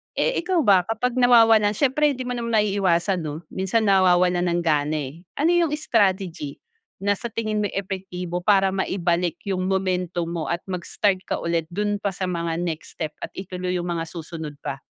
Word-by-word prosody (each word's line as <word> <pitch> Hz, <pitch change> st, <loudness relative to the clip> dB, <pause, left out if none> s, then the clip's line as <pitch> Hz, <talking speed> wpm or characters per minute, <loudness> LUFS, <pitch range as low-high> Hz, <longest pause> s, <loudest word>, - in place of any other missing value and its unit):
Eh, -, -, +1 dB
ikaw 360 Hz, 0 st, 0 dB
ba 190 Hz, -4 st, +5 dB
kapag 235 Hz, +3 st, -1 dB
nawawalan 225 Hz, -4 st, +6 dB
siyempre 290 Hz, +3 st, +2 dB
'di 255 Hz, -, -6 dB
mo 250 Hz, -, -2 dB
maiiwasan 200 Hz, -5 st, +1 dB
'no, 155 Hz, +2 st, -5 dB
minsan 190 Hz, +4 st, 0 dB
nawawalan 180 Hz, -2 st, +4 dB
ng 175 Hz, 0 st, +1 dB
gana, 150 Hz, -1 st, +1 dB
eh. 165 Hz, +5 st, -16 dB, 0.2 s
Ano 325 Hz, -, +4 dB
yung 340 Hz, -3 st, +3 dB
strategy 190 Hz, -, 0 dB, 0.4 s
na 200 Hz, -1 st, +2 dB
sa 235 Hz, -, -4 dB
tingin 215 Hz, -1 st, -2 dB
mo 205 Hz, -, +1 dB
epektibo 185 Hz, -3 st, -4 dB
para 195 Hz, 0 st, +3 dB
maibalik 175 Hz, -3 st, 0 dB
yung 185 Hz, -2 st, -1 dB
momentum 180 Hz, -2 st, 0 dB
mo 170 Hz, -2 st, -3 dB
at 170 Hz, +1 st, -2 dB
mag-start 185 Hz, +2 st, 0 dB
ka -, -, 0 dB
ulit 170 Hz, -1 st, -1 dB
dun 205 Hz, +3 st, -1 dB
pa 200 Hz, -3 st, -2 dB
sa 185 Hz, -, -4 dB
mga 170 Hz, -1 st, -2 dB
next 165 Hz, -2 st, -5 dB
step 155 Hz, -3 st, -3 dB
at -, -, -4 dB
ituloy 185 Hz, -1 st, -4 dB
yung 175 Hz, 0 st, -2 dB
mga 165 Hz, -1 st, -2 dB
susunod 160 Hz, -3 st, -7 dB
pa? 135 Hz, 0 st, -4 dB
185 Hz, 175 wpm, -23 LUFS, 170-210 Hz, 0.4 s, nawawalan